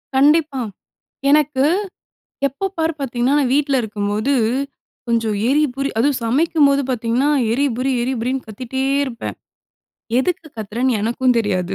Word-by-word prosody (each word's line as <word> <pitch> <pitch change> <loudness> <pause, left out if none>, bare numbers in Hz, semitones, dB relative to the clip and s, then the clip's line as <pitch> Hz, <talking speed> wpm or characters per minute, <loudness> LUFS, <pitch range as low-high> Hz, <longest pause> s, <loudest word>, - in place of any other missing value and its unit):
கண்டிப்பா, 290 0 +3 0.7
எனக்கு 295 -2 +3 0.8
எப்ப 385 +9 -3
பார் 325 0 +1
பார்த்தீங்கன்னா, 255 0 0
நான் 270 -4 +1
வீட்ல 285 -1 +2
இருக்கும்போது 210 +3 -1 0.8
கொஞ்சம் 225 -3 +1
எறிபுரி 275 -1 +1
அதுவும் 270 +2 +2
சமைக்கும்போது 280 +2 +3
பார்த்தீங்கன்னா, 240 +3 0 0.2
எரிபுரி 265 0 0
எரிபுரின்னு 255 +1 -2
கத்திட்டே 255 +4 -4 0.2
இருப்பேன். 235 -4 -6 0.8
எதுக்கு 330 +3 -1
கத்துறேன்னு 225 +3 -1
எனக்கும் 240 +3 +1
தெரியாது. 195 -4 -1
260 Hz, 105 wpm, -19 LUFS, 230-280 Hz, 0.8 s, கண்டிப்பா